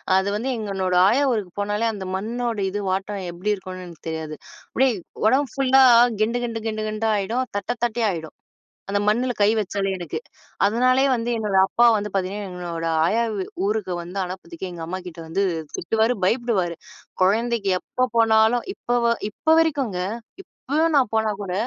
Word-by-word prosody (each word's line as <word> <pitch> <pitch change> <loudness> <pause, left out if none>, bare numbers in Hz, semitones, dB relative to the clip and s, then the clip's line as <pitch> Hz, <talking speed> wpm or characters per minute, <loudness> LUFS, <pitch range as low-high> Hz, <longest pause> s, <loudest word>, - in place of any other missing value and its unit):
அது 190 +1 +2
வந்து 235 +6 -2
எங்கனோட 195 -4 -1
ஆயா 255 +8 +3
ஊருக்கு 205 -6 -2
போனாலே, 205 +2 0
அந்த 195 -2 -6
மண்ணோட 230 +3 -2
இது, 205 +2 -3
வாட்டம் 195 +2 -2
எப்டி 185 +5 -2
இருக்கும்னு 185 -2 -7
எனக்கு 170 -3 -13
தெரியாது. 160 -1 -5 0.4
அப்டியே 265 0 +3 0.3
உடம்பு 265 +5 +3
ஃபுல்லா 270 -1 +4 0.4
கெண்டு 235 +3 +1
கெண்டு 230 -2 -3
கெண்டு 215 0 -2
கெண்டா 215 +1 -1
ஆயிடும். 225 +6 -1
தட்ட 200 - -6 0.2
தட்டயா 235 -1 0
ஆயிடும். 160 -2 -7 0.6
அந்த 200 - +1
மண்ணுல 245 +4 +2
கை 205 - +5
வச்சாலே 195 -1 -2
எனுக்கு. 175 - -5 0.5
அதனாலேயே 255 +5 +3
வந்து 235 +1 -2
என்னோட 210 -3 -1
அப்பா 240 0 +4
வந்து 210 -1 -4
பாத்தீங்கன்னா, 195 +1 -2
எங்களோட 170 -2 -5 0.2
ஆயா 230 +5 +2
வ்வு 190 - -3 0.2
ஊருக்கு 210 -4 -1
வந்து 180 +3 -5
அனுப்புறதுக்கே 180 0 -7
எங்க 170 -1 -7
அம்மாகிட்ட 180 -2 -6
வந்து 195 +5 0 0.3
திட்டுவாரு, 225 +6 +1
பயப்படுவாரு. 205 -7 0 0.5
கொழந்தைக்கு 220 +1 +2
எப்போ 255 0 -1
போனாலும். 225 +1 +4
இப்ப 245 -6 -1
வ 235 - +3 0.2
இப்போ 315 +9 -2
வரைக்கும் 290 -8 +1
இருக்குங்க. 180 - -2 0.7
இப்போயும் 315 +3 +2
நான் 255 -6 +3
போனா 220 -1 +2
கூட, 190 -3 -4
210 Hz, 165 wpm, -23 LUFS, 185-235 Hz, 0.7 s, கை